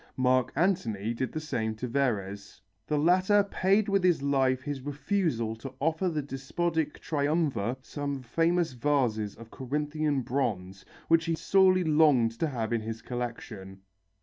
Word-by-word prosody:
Mark 130 -1 +2
Antony 115 - 0
did 125 +1 -3
the 155 - -3
same 120 -8 -2
to 125 +3 -4
Verres. 100 -7 -2 0.3
The 150 - 0
latter 185 +6 +4
paid 195 +1 +1
with 195 -2 +1
his 175 -6 +3
life 130 -2 +1
his 145 -2 -4
refusal 145 - -1
to 130 +3 -9
offer 160 +5 0
the 155 -3 -2
despotic 150 +3 -2
Triumvir 145 -6 0
some 140 -1 -5
famous 165 +4 +1
vases 120 -6 0
of 115 0 -13
Corinthian 150 +1 -1
bronze 100 -8 -2 0.2
which 165 0 +4
he 165 -1 0
sorely 185 +1 +4
longed 150 -7 +4
to 165 - +1
have 120 -5 -3
in 115 - 0
his 115 +1 -6
collection. 110 -6 -6
140 Hz, 150 wpm, -28 LUFS, 115-160 Hz, 0.3 s, latter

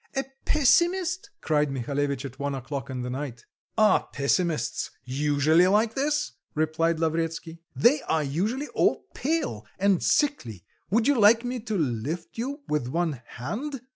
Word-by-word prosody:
a 270 - 0 0.2
pessimist?" 350 +5 +2
cried 150 -2 +1
Mihalevitch 140 +2 -2
at 130 -1 -9
one 140 0 -2
o'clock 135 +2 -5
in 125 -1 -4
the 125 - -4
night. 125 -3 -5 0.3
"Are 215 -3 +4
pessimists 145 - 0
usually 145 +6 +3
like 215 +3 +3
this?" 295 +3 0 0.2
replied 160 +2 +1
Lavretsky. 165 0 -2
"They 275 +5 +4
are 160 -1 +2
usually 205 - -1
all - - +1
pale 275 - -1
and 195 -2 +3
sickly 120 - 0 0.3
would 225 +4 +2
you 285 -4 +3
like 225 +3 +6
me 245 0 -2
to 215 -2 -3
lift 145 +3 -2
you 280 +5 -3
with 150 -5 -1
one 160 -2 -1
hand?" 235 - -5
165 Hz, 145 wpm, -26 LUFS, -, 0.3 s, like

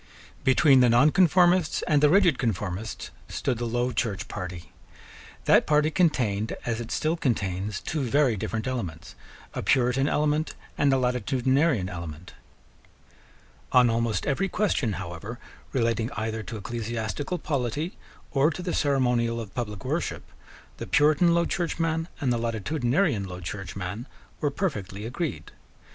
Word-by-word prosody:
Between 135 +1 +5
the 125 -1 +5
nonconformists 175 +6 +4
and 150 -2 +2
the 150 - +6
rigid 180 -5 +4
conformists 105 -2 -3 0.2
stood 125 -4 -2
the 120 - -2
Low 120 +2 0
Church 105 -6 -2
party. 90 -3 -7 0.7
That - - +5
party 150 +1 +3
contained, 115 - +1
as 115 -1 -1
it 115 - -7
still 155 +6 0
contains, 100 - -1
two 155 - -3
very 135 -1 +2
different 110 +3 -3
elements, 90 -11 -4 0.4
a - - -3
Puritan 130 +1 +2
element 150 +1 0 0.2
and 140 -1 +3
a 135 - +4
Latitudinarian 130 - +1
element. 85 -1 -7 1.4
On 125 -2 +6
almost 115 -4 0
every 190 +8 0
question, 145 - 0
however, 95 +5 -6 0.3
relating 115 -2 0
either 110 0 -3
to 110 +2 -7
ecclesiastical 115 - -3
polity 150 - -2 0.4
or 140 +2 +3
to 180 +2 -5
the 175 - -2
ceremonial 125 -5 +1
of 110 -3 -7
public 105 -5 -5
worship, - - -2 0.5
the - - -6
Puritan 155 +3 +4
Low 170 0 +3
Churchman 165 -2 -1
and 130 -4 +1
the 120 - -1
Latitudinarian 120 - 0
Low 90 0 -7
Churchman 95 +4 -5 0.3
were 145 - +1
perfectly 105 - -3
agreed. 150 +7 -4
125 Hz, 135 wpm, -26 LUFS, 110-150 Hz, 1.4 s, the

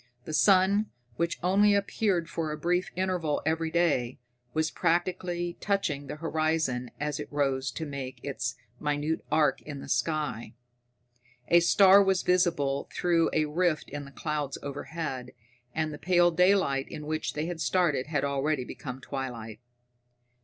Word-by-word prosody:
The 155 - -6
sun, 195 +4 +4 0.3
which 170 0 0
only 200 +3 +4
appeared 200 -3 0
for 160 -2 -3
a 150 - -4
brief 180 +3 0
interval 180 -5 0
every 160 +1 0
day, 150 -8 +1 0.3
was 155 +3 0
practically 175 0 -1
touching 160 -9 -1
the - - -5
horizon 155 -5 -1
as 150 0 -2
it 150 - -7
rose 135 -2 0
to 160 - -4
make 140 -3 -6
its 125 -3 -3 0.2
minute 150 +2 -1
arc 155 -1 +3
in 145 -2 -7
the - - -9
sky. 125 -3 -1 0.9
A 170 - +7
star 190 +3 +7
was 190 -2 +1
visible 165 -7 +1
through 170 -2 +2
a 155 -1 +2
rift 160 +1 0
in 145 0 -5
the 140 - -12
clouds 150 -2 -3
overhead, 140 -2 -5 0.4
and 155 -1 -1
the 150 - -8
pale 175 -1 +4
daylight 180 -6 +3
in 150 - -7
which 155 +1 -2
they 150 +1 -2
had 170 -1 -4
started 165 -9 +1
had 150 -3 0
already 140 0 0
become 130 0 -7
twilight. 120 -6 -6
155 Hz, 150 wpm, -28 LUFS, 140-175 Hz, 0.9 s, A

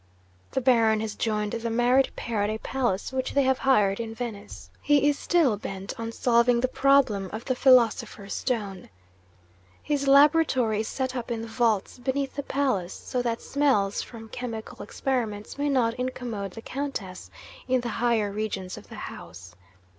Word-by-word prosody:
The 265 - -1
Baron 230 -4 +4
has 220 -1 -3
joined 210 -2 -1
the 230 0 -3
married 245 +3 +3
pair 225 -3 -2
at 205 - +1
a 215 - -2
palace 240 -2 -2
which 260 0 -2
they 280 - +4
have 265 0 +2
hired 210 -7 +3
in 225 -1 -5
Venice. 105 - -7
He 290 -1 +3
is 290 -1 +1
still 310 -11 +2
bent 195 -1 -6
on 230 0 -4
solving 235 0 +3
the 255 - +2
problem 255 -8 +2
of 220 +2 -6
the 260 - +1
"Philosopher's 240 -5 +3
Stone." 205 -7 -3 0.9
His 285 -2 -1
laboratory 275 -6 +4
is 220 - -2
set 260 -1 -3
up 245 -1 -4
in 230 -1 -3
the - - -6
vaults 225 -1 0
beneath 270 +2 -2
the 285 - -2
palace 260 -11 -1
so 250 - -3
that 235 -1 -2
smells 260 -9 +1
from 225 -2 -10
chemical 230 -2 -6
experiments 230 -3 -3
may 290 0 +1
not 245 -4 +2
incommode 235 -6 -4
the 225 - -9
Countess, 255 -10 -5 0.4
in 255 -1 +2
the 240 - -4
higher 225 -4 +2
regions 200 -3 -4
of - - -18
the - - -9
house. 90 -2 -10
235 Hz, 170 wpm, -26 LUFS, 210-265 Hz, 0.9 s, Baron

